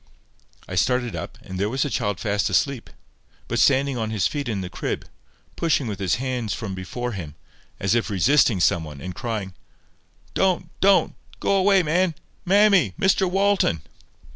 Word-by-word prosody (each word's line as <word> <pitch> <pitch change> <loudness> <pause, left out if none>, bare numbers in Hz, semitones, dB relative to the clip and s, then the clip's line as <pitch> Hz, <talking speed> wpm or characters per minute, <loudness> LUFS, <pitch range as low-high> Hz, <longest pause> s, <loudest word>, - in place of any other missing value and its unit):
I - - -7
started 120 +5 +1
up, - - -6
and 95 0 -7
there 100 +2 0
was 130 +2 0
the 145 - -2
child 105 -4 -1
fast 105 +1 0
asleep, 140 -4 0 0.6
but 120 - -1
standing 135 -1 +3
on 110 -1 -2
his 110 -3 0
feet 145 -4 -2
in 100 -4 -2
his 90 - -7
crib, - - -3 0.5
pushing 160 -5 +1
with 105 -4 -4
his 95 -1 +1
hands 125 -3 -2
from 110 -4 -5
before 120 +7 -4
him, 80 -8 -7 0.4
as 95 +2 +1
if 120 -1 +1
resisting 110 - +3
some 85 -1 +2
one, 75 -3 -9
and 90 +5 -6
crying— 105 -1 -4 0.8
"Don't. 190 -2 +1
Don't. 195 0 +4 0.3
Go 200 - +1
away, 195 -1 +4
man. 170 +2 +1 0.3
Mammy! 195 - +4
Mr 190 -1 +3
Walton!" 195 - +1
120 Hz, 165 wpm, -23 LUFS, 95-160 Hz, 0.8 s, Don't